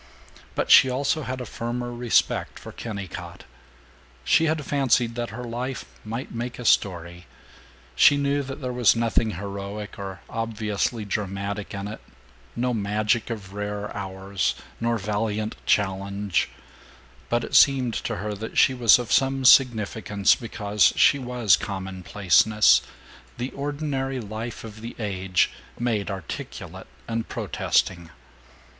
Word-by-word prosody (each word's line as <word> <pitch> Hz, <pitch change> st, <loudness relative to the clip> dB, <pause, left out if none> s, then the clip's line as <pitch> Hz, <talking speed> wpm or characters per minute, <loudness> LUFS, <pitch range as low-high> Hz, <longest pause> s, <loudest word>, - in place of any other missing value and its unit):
But -, -, 0 dB
she 130 Hz, -, +9 dB
also 140 Hz, +4 st, 0 dB
had 130 Hz, -2 st, -4 dB
a -, -, -5 dB
firmer 120 Hz, +2 st, -4 dB
respect 120 Hz, -1 st, +1 dB
for -, -, -10 dB
Kennicott. 100 Hz, -7 st, -7 dB, 0.8 s
She 165 Hz, -, +4 dB
had 155 Hz, -2 st, 0 dB
fancied 125 Hz, -4 st, +2 dB
that 120 Hz, 0 st, -3 dB
her 120 Hz, +3 st, -7 dB
life 125 Hz, +2 st, -4 dB, 0.2 s
might 115 Hz, +4 st, -5 dB
make 120 Hz, +1 st, -4 dB
a 125 Hz, -, -7 dB
story. 85 Hz, -4 st, +1 dB, 0.7 s
She 145 Hz, -, +6 dB
knew 140 Hz, 0 st, +1 dB
that 135 Hz, +2 st, -7 dB
there 125 Hz, -1 st, -3 dB
was 120 Hz, -2 st, +4 dB
nothing 115 Hz, -1 st, +1 dB
heroic 100 Hz, +2 st, -6 dB
or 95 Hz, -2 st, -6 dB
obviously 110 Hz, 0 st, -2 dB
dramatic 100 Hz, 0 st, -3 dB
in 100 Hz, 0 st, -4 dB
it, 110 Hz, -, -8 dB, 0.5 s
no 125 Hz, +1 st, 0 dB
magic 105 Hz, +2 st, 0 dB
of 100 Hz, -4 st, -6 dB
rare 105 Hz, 0 st, -4 dB
hours, 95 Hz, -1 st, -2 dB, 0.2 s
nor 115 Hz, 0 st, 0 dB
valiant 105 Hz, +1 st, -2 dB
challenge, 100 Hz, 0 st, 0 dB, 0.8 s
but 120 Hz, 0 st, +1 dB
it -, -, -7 dB
seemed 130 Hz, -4 st, +5 dB
to 115 Hz, -, -3 dB
her 105 Hz, 0 st, -4 dB
that 110 Hz, +2 st, -7 dB
she 130 Hz, -, +5 dB
was 120 Hz, -4 st, +6 dB
of 120 Hz, -2 st, -5 dB
some 135 Hz, 0 st, +2 dB
significance 110 Hz, -5 st, +4 dB
because 105 Hz, -3 st, +1 dB
she 140 Hz, -, +5 dB
was 120 Hz, -7 st, +3 dB
commonplaceness, 95 Hz, -, +2 dB, 0.6 s
the 125 Hz, +2 st, -3 dB
ordinary 140 Hz, -2 st, -3 dB
life 110 Hz, +1 st, -6 dB
of 110 Hz, -1 st, -10 dB
the 115 Hz, +1 st, -7 dB
age, 95 Hz, -4 st, 0 dB, 0.3 s
made 110 Hz, -4 st, -1 dB
articulate 95 Hz, -5 st, -7 dB, 0.2 s
and 115 Hz, 0 st, -3 dB
protesting. 85 Hz, -3 st, -1 dB
110 Hz, 135 wpm, -25 LUFS, 100-125 Hz, 0.8 s, she